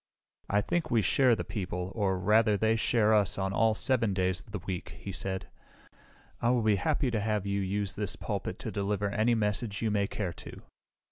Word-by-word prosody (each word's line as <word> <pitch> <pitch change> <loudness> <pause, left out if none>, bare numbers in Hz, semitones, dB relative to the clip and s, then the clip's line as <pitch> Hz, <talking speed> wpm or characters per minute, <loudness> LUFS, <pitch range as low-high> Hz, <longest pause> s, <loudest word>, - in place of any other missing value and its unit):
"I 105 +1 +3
think 160 +8 -1
we 115 -3 +2
share 130 +1 +4
the - - -3
people, 90 -3 -4
or, 100 -4 0
rather, 105 +3 +3
they 110 +2 +2
share 110 -1 +3
us 105 -3 +2
on 95 0 -1
all 110 +1 +3
7 115 -6 +1
days 95 -1 +1
of - - -15
the 105 - -4
week," 95 -1 -6
he 100 - -6
said. 95 0 -4 0.9
"I 120 - +2
will 120 -2 +2
be 105 -2 +3
happy 125 - 0
to 110 - 0
have 105 -1 -1
you 100 0 -1
use 100 +1 -1
this 105 -2 -2
pulpit - - -4
to - - -5
deliver 100 0 -1
any 115 +3 +2
message 105 0 -1
you 110 - +1
may 100 -1 +1
care 95 -5 -3
to." - - -11
105 Hz, 205 wpm, -30 LUFS, 100-110 Hz, 0.9 s, share